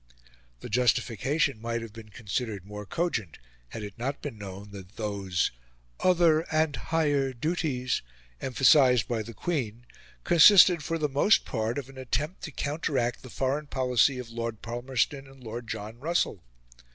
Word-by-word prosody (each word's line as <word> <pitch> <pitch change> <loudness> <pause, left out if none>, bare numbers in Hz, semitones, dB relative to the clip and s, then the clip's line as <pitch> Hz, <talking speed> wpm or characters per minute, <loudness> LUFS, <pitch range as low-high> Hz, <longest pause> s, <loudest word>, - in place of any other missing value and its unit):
The - - -7
justification 125 +3 +1
might 115 0 -2
have 115 -2 -9
been 110 -1 -11
considered 105 -2 -4
more 105 0 -8
cogent 115 - -2 0.3
had 110 - -7
it 105 +2 -9
not 135 +4 -2
been 145 -6 -6
known 100 0 -9
that 95 0 -11
those 100 -4 -1 0.5
"other 170 -3 +4
and 155 -1 +2
higher 145 -5 0
duties" 130 -2 -1 0.4
emphasised 130 -3 +4
by 115 -2 -1
the 115 +1 -9
Queen 120 - -3 0.4
consisted 175 -1 +7
for 165 - -1
the 155 -2 0
most 145 +10 +3
part 110 +1 -2
of 140 -3 -4
an 135 -1 -12
attempt 150 +7 -2
to 160 - -7
counteract 140 -4 -1
the 130 - -11
foreign 140 +4 -1
policy 130 0 +2
of 125 -2 -7
Lord 115 -1 -4
Palmerston 125 +3 -2
and 135 -1 -16
Lord 115 +1 -6
John 110 +2 -6
Russell. 155 - 0
125 Hz, 150 wpm, -28 LUFS, 110-145 Hz, 0.5 s, consisted